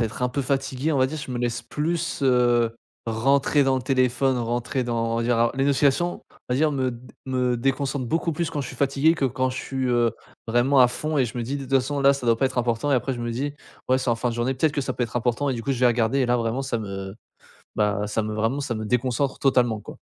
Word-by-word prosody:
à -, -, +3 dB
être 110 Hz, +2 st, -5 dB
un 125 Hz, -, +2 dB
peu 140 Hz, +3 st, -2 dB
fatigué, 135 Hz, +2 st, -1 dB
on 145 Hz, -, +1 dB
va 130 Hz, -, +4 dB
dire 155 Hz, -, -5 dB
je 140 Hz, -3 st, -6 dB
me 125 Hz, -, -3 dB
laisse 120 Hz, -1 st, -2 dB
plus, 165 Hz, +2 st, -2 dB
heu, 120 Hz, -3 st, +3 dB, 0.3 s
rentrer 135 Hz, +5 st, +2 dB
dans 135 Hz, -1 st, +2 dB
le 130 Hz, -, -3 dB
téléphone, 130 Hz, 0 st, +2 dB
rentrer 120 Hz, +2 st, -1 dB
dans 115 Hz, -1 st, -1 dB
on -, -, 0 dB
va -, -, 0 dB
dire, 120 Hz, 0 st, +1 dB
heu 115 Hz, 0 st, +3 dB
les 135 Hz, +1 st, 0 dB
notifications 140 Hz, +5 st, +1 dB
on -, -, -8 dB
va -, -, +1 dB
dire 155 Hz, +1 st, +2 dB
me 130 Hz, -2 st, 0 dB
d 120 Hz, +1 st, -10 dB, 0.2 s
me 125 Hz, -2 st, 0 dB
déconcentre 135 Hz, +1 st, -1 dB
beaucoup 165 Hz, +4 st, 0 dB
plus 165 Hz, +1 st, -2 dB
quand 145 Hz, -, -3 dB
je 135 Hz, -, -4 dB
suis 130 Hz, -, -8 dB
fatigué 140 Hz, +5 st, +3 dB
que 140 Hz, -, 0 dB
quand 130 Hz, +1 st, 0 dB
je 130 Hz, -, -5 dB
suis, 130 Hz, -1 st, -3 dB
heu, 120 Hz, -1 st, +3 dB, 0.4 s
vraiment 125 Hz, +4 st, +3 dB
à 125 Hz, -, +7 dB
fond 155 Hz, +5 st, -2 dB
et 135 Hz, -, +3 dB
je 120 Hz, +1 st, -5 dB
me 120 Hz, -, -2 dB
dis: 135 Hz, +5 st, -3 dB
«De 140 Hz, -, -6 dB
toute 135 Hz, +1 st, -3 dB
façon 135 Hz, +2 st, +1 dB
là, 140 Hz, 0 st, +6 dB
ça 135 Hz, -3 st, -5 dB
doit 115 Hz, -1 st, +4 dB
pas 135 Hz, -, +2 dB
être 130 Hz, -, -3 dB
important» 120 Hz, +4 st, 0 dB
et -, -, +5 dB
après 135 Hz, +2 st, -1 dB
je 120 Hz, -, -6 dB
me 120 Hz, 0 st, -3 dB
dis: 140 Hz, +5 st, -3 dB, 0.3 s
«Ouais, 130 Hz, -, +4 dB
c'est 130 Hz, -1 st, -1 dB
en 115 Hz, -, +1 dB
fin 125 Hz, +2 st, -1 dB
de -, -, -5 dB
journée, 120 Hz, +3 st, 0 dB
peut-être 145 Hz, +4 st, +1 dB
que 145 Hz, -, -1 dB
ça -, -, -2 dB
peut 125 Hz, -, -1 dB
être 120 Hz, +1 st, -6 dB
important» 120 Hz, +4 st, 0 dB
et 135 Hz, -, 0 dB
du 115 Hz, -, -5 dB
coup 140 Hz, -, -2 dB
je 130 Hz, -, -1 dB
vais 125 Hz, -, +4 dB
regarder 120 Hz, +2 st, +2 dB
et 130 Hz, -, +2 dB
là 120 Hz, 0 st, +2 dB
vraiment 115 Hz, +3 st, -1 dB
ça 130 Hz, -3 st, -2 dB
me 95 Hz, -2 st, -6 dB, 0.6 s
bah 105 Hz, -1 st, 0 dB
ça 110 Hz, +2 st, -1 dB
me 110 Hz, 0 st, -3 dB
vraiment, 115 Hz, +6 st, 0 dB
ça 135 Hz, -5 st, -3 dB
me 110 Hz, -, -4 dB
déconcentre 125 Hz, +3 st, 0 dB
totalement 120 Hz, -5 st, +2 dB
quoi. -, -, -11 dB
125 Hz, 285 wpm, -24 LUFS, 120-135 Hz, 0.6 s, à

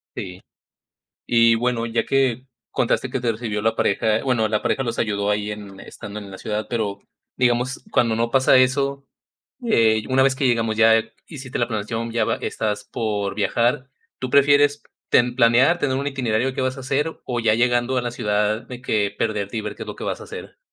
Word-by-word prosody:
Sí. 90 Hz, 0 st, -7 dB, 0.9 s
Y 115 Hz, -1 st, +5 dB
bueno, 120 Hz, 0 st, 0 dB
ya 115 Hz, 0 st, -1 dB
que 130 Hz, -2 st, +1 dB, 0.2 s
contaste -, -, 0 dB
que -, -, -1 dB
te 120 Hz, -2 st, 0 dB
recibió 110 Hz, -2 st, -3 dB
la 115 Hz, +1 st, +1 dB
pareja, 110 Hz, +2 st, +1 dB
bueno, 120 Hz, -5 st, +1 dB
la 105 Hz, 0 st, -1 dB
pareja 135 Hz, -, 0 dB
los 115 Hz, -1 st, -3 dB
ayudó 100 Hz, -2 st, 0 dB
ahí 105 Hz, 0 st, -1 dB
en 100 Hz, -2 st, -8 dB
estando 105 Hz, -1 st, -9 dB
en 100 Hz, -1 st, -10 dB
la 95 Hz, -, -9 dB
ciudad, 105 Hz, 0 st, -3 dB
pero, 105 Hz, -4 st, -2 dB, 0.4 s
digamos, 125 Hz, +1 st, 0 dB
cuando 115 Hz, -2 st, +2 dB
no 115 Hz, +1 st, 0 dB
pasa 130 Hz, 0 st, +4 dB
eso, 140 Hz, +2 st, +2 dB, 0.6 s
eh, 110 Hz, -, +3 dB
una 130 Hz, 0 st, +3 dB
vez 135 Hz, 0 st, +2 dB
que 135 Hz, 0 st, +1 dB
llegamos 115 Hz, -3 st, +1 dB
ya, 115 Hz, 0 st, +5 dB, 0.2 s
hiciste 130 Hz, -5 st, -7 dB
la 120 Hz, -, +1 dB
planeación, 115 Hz, +1 st, -3 dB
ya 115 Hz, -, +1 dB
va -, -, 0 dB
estás 105 Hz, -2 st, -3 dB
por 105 Hz, -4 st, -3 dB
viajar, 120 Hz, +6 st, 0 dB, 0.3 s
¿tú 130 Hz, -, -3 dB
prefieres 145 Hz, +1 st, +4 dB, 0.3 s
ten 120 Hz, 0 st, +3 dB
planear, 125 Hz, +9 st, +4 dB
tener 130 Hz, -2 st, 0 dB
un 140 Hz, +1 st, -2 dB
itinerario 130 Hz, -2 st, -1 dB
que -, -, -3 dB
vas 130 Hz, +1 st, -1 dB
a -, -, -7 dB
hacer, 140 Hz, +5 st, -2 dB
o, 120 Hz, -2 st, -2 dB
ya 110 Hz, -2 st, +3 dB
llegando 120 Hz, +2 st, +1 dB
a -, -, -1 dB
la 120 Hz, -, -2 dB
ciudad, 105 Hz, -1 st, 0 dB
de 125 Hz, -1 st, -10 dB
que 105 Hz, -5 st, 0 dB
perderte 105 Hz, -1 st, -2 dB
y -, -, -3 dB
ver -, -, -5 dB
qué -, -, -7 dB
es -, -, -17 dB
lo -, -, -6 dB
que -, -, -7 dB
vas -, -, -3 dB
a -, -, -8 dB
hacer? -, -, -10 dB
115 Hz, 205 wpm, -22 LUFS, 110-130 Hz, 0.9 s, Y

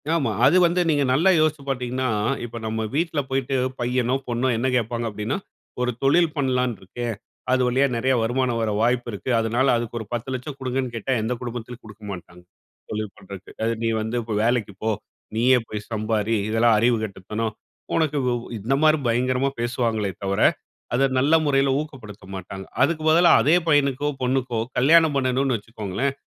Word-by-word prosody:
ஆமா, 155 Hz, -5 st, +1 dB
அது 180 Hz, -, +5 dB
வந்து 175 Hz, +1 st, +2 dB
நீங்க 145 Hz, -2 st, +3 dB
நல்லா 165 Hz, +8 st, +4 dB
யோசிச்சு 155 Hz, -2 st, +1 dB
பார்த்தீங்கன்னா, 130 Hz, 0 st, -1 dB, 0.4 s
இப்ப 120 Hz, 0 st, -8 dB
நம்ம 110 Hz, 0 st, -2 dB
வீட்ல 160 Hz, -1 st, 0 dB
போயிட்டு 135 Hz, 0 st, -1 dB, 0.2 s
பையனோ, 125 Hz, +1 st, +1 dB
பொண்ணோ 120 Hz, +1 st, 0 dB
என்ன 125 Hz, +3 st, 0 dB
கேப்பாங்க 120 Hz, 0 st, -1 dB
அப்படின்னா, 105 Hz, -, -3 dB, 0.4 s
ஒரு 125 Hz, 0 st, +1 dB
தொழில் 165 Hz, +5 st, +4 dB
பண்ணலாம்னு 125 Hz, -4 st, 0 dB
இருக்கேன், 115 Hz, +4 st, -4 dB, 0.4 s
அது 130 Hz, 0 st, +3 dB
வழியா 130 Hz, +3 st, +3 dB
நெறைய 130 Hz, +3 st, +1 dB
வருமானம் 120 Hz, 0 st, 0 dB
வர 110 Hz, -, 0 dB
வாய்ப்பு 120 Hz, +1 st, +1 dB
இருக்கு. 100 Hz, +5 st, -6 dB
அதனால 120 Hz, +4 st, +1 dB
அதுக்கு 120 Hz, 0 st, -4 dB
ஒரு 110 Hz, -, -6 dB
10 120 Hz, +2 st, -3 dB
லட்சம் 130 Hz, +2 st, -5 dB
குடுங்கன்னு 130 Hz, -1 st, -2 dB
கேட்டா, 115 Hz, +4 st, -3 dB
எந்த 115 Hz, +3 st, -1 dB
குடும்பத்துலயும் 120 Hz, 0 st, -6 dB
குடுக்க 110 Hz, 0 st, -13 dB
மாட்டாங்க, 90 Hz, -1 st, -10 dB, 0.5 s
தொழில் 105 Hz, -1 st, -4 dB
பண்றதுக்கு. 100 Hz, -1 st, -11 dB
அது 115 Hz, -, +1 dB
"நீ 115 Hz, -, +2 dB
வந்து 110 Hz, +3 st, -2 dB, 0.3 s
வேலைக்கு 115 Hz, -4 st, +1 dB
போ, 110 Hz, -, +1 dB, 0.5 s
நீயே 125 Hz, +3 st, +4 dB
போய் 105 Hz, -1 st, -6 dB
சம்பாரி, 110 Hz, 0 st, 0 dB
இதெல்லாம் 115 Hz, +1 st, +4 dB
அறிவு 120 Hz, +1 st, +3 dB
கெட்டத்தனம் 110 Hz, +2 st, -4 dB, 0.4 s
உனக்கு" 155 Hz, -2 st, +1 dB, 0.4 s
இந்த 115 Hz, +7 st, -1 dB
மாதிரி 155 Hz, 0 st, +5 dB
பயங்கரமா 130 Hz, +3 st, +1 dB
பேசுவாங்களே 115 Hz, -4 st, -1 dB
தவிர, 100 Hz, 0 st, -1 dB, 0.5 s
அத 135 Hz, +3 st, +3 dB
நல்ல 145 Hz, +5 st, +2 dB
முறையில 135 Hz, -1 st, +3 dB
ஊக்கப்படுத்த 115 Hz, -10 st, -8 dB
மாட்டாங்க. 95 Hz, +1 st, -7 dB, 0.2 s
அதுக்கு 155 Hz, +3 st, +2 dB
பதிலா, 170 Hz, +2 st, +6 dB
அதே 155 Hz, +5 st, +4 dB
பையனுக்கோ 145 Hz, -2 st, +2 dB
பொண்ணுக்கோ 125 Hz, -2 st, 0 dB, 0.2 s
கல்யாணம் 160 Hz, +3 st, +5 dB
பண்ணனும்னு 130 Hz, -1 st, +1 dB
வச்சுக்கோங்களேன், 110 Hz, +4 st, -3 dB
125 Hz, 160 wpm, -23 LUFS, 110-135 Hz, 0.5 s, பதிலா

